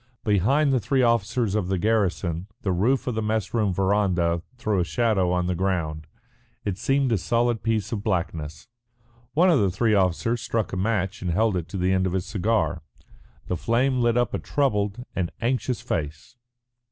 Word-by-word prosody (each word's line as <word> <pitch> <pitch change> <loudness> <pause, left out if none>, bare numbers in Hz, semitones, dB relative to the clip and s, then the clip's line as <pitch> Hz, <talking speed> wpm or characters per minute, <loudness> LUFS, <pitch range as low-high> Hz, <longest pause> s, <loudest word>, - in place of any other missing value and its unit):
Behind 135 - +2
the 130 - +3
three 130 +5 +1
officers 115 -2 +1
of 105 -4 0
the 95 0 0
garrison 95 -4 0 0.2
the 95 - 0
roof 115 +10 +1
of 125 - -1
the 110 - -1
mess 110 -2 -1
room 110 -4 +1
verandah 95 -3 +1 0.2
threw 110 -5 0
a - - +3
shadow 105 -2 +1
on 90 0 +1
the 90 - 0
ground; 85 -4 -2 0.6
it 100 -1 -2
seemed 135 +1 +1
a 110 - +2
solid 120 +3 +1
piece 110 -2 -1
of 105 -3 -3
blackness. 85 -7 -3 0.7
One 180 +4 +5
of 155 - +4
the 100 - +3
three 110 +4 +1
officers 100 +5 +1
struck 115 -2 -2
a - - 0
match 100 0 -1
and 90 - -2
held 105 +4 +2
it 85 -3 -3
to 100 - -6
the 90 +1 +1
end 95 0 +2
of 90 - -3
his 95 -1 -1
cigar. 105 -4 0 0.6
The 90 - -2
flame 125 - +1
lit 120 0 +2
up 120 - +1
a - - -1
troubled 110 -4 -1
and 90 -3 -1
anxious 125 -1 -1
face. 75 - -4
105 Hz, 190 wpm, -25 LUFS, 90-115 Hz, 0.7 s, One